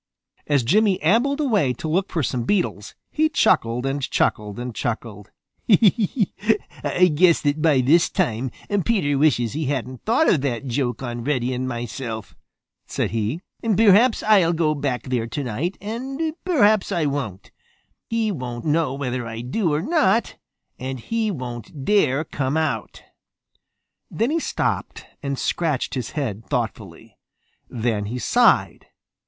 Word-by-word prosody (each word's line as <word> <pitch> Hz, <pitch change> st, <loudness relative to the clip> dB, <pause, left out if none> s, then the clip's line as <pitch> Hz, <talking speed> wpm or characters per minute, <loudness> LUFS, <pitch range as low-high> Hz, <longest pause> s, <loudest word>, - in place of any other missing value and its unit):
As 145 Hz, -4 st, +2 dB
Jimmy 200 Hz, -, +3 dB
ambled 240 Hz, -, +2 dB
away 210 Hz, -, +2 dB
to 160 Hz, -, -6 dB
look 185 Hz, +5 st, 0 dB
for 160 Hz, -, -1 dB
some 125 Hz, 0 st, -1 dB
beetles, 120 Hz, -, -1 dB, 0.2 s
he 310 Hz, +1 st, +2 dB
chuckled 120 Hz, -, +2 dB
and 135 Hz, +1 st, -1 dB
chuckled 105 Hz, -4 st, -1 dB
and 125 Hz, 0 st, -5 dB
chuckled. 110 Hz, -3 st, -4 dB, 0.4 s
"I 205 Hz, -3 st, +2 dB
guess 170 Hz, +2 st, +4 dB
that 145 Hz, +1 st, 0 dB
by 150 Hz, -5 st, +4 dB
this 160 Hz, +7 st, +4 dB
time 130 Hz, -, -1 dB, 0.3 s
Peter 170 Hz, -11 st, +1 dB
wishes 125 Hz, -7 st, +2 dB
he 155 Hz, +1 st, -2 dB
hadn't 130 Hz, -2 st, -3 dB
thought 235 Hz, +9 st, +2 dB
of 150 Hz, -, +3 dB
that 130 Hz, -2 st, -2 dB
joke 125 Hz, -1 st, -2 dB
on 120 Hz, -1 st, -4 dB
Reddy 125 Hz, -3 st, 0 dB
Fox 130 Hz, -, -2 dB
and 130 Hz, +1 st, -2 dB
myself," 120 Hz, -2 st, -5 dB, 0.5 s
said -, -, -2 dB
he. 115 Hz, +9 st, -2 dB, 0.2 s
"Perhaps 225 Hz, +2 st, +4 dB
I'll 195 Hz, -6 st, +4 dB
go 160 Hz, -2 st, +1 dB
back 140 Hz, -4 st, -2 dB
there 125 Hz, -3 st, -2 dB
tonight 140 Hz, -, -3 dB
and 270 Hz, +9 st, -4 dB
perhaps 215 Hz, -, +3 dB
I 165 Hz, -3 st, 0 dB
won't. 135 Hz, -10 st, -4 dB, 0.6 s
He 225 Hz, -2 st, 0 dB
won't 125 Hz, -8 st, -5 dB
know 150 Hz, -3 st, +1 dB
whether 125 Hz, -3 st, -3 dB
I 115 Hz, 0 st, -6 dB
do 160 Hz, -, -1 dB
or 150 Hz, +2 st, 0 dB
not, 285 Hz, -, +2 dB, 0.4 s
and 130 Hz, 0 st, -4 dB
he 225 Hz, -, -1 dB
won't 130 Hz, -, -6 dB
dare 155 Hz, -9 st, +3 dB
come 140 Hz, -1 st, -2 dB
out." 145 Hz, -9 st, -2 dB, 1.1 s
Then 230 Hz, +6 st, 0 dB
he 330 Hz, -, +1 dB
stopped -, -, -2 dB, 0.2 s
and 140 Hz, -1 st, -3 dB
scratched 155 Hz, -4 st, -1 dB
his 125 Hz, -4 st, -4 dB
head 115 Hz, -7 st, -2 dB
thoughtfully. -, -, -5 dB, 0.5 s
Then 110 Hz, -3 st, -1 dB
he 115 Hz, +5 st, -4 dB
sighed. 240 Hz, -, +2 dB
145 Hz, 145 wpm, -22 LUFS, 125-200 Hz, 1.1 s, guess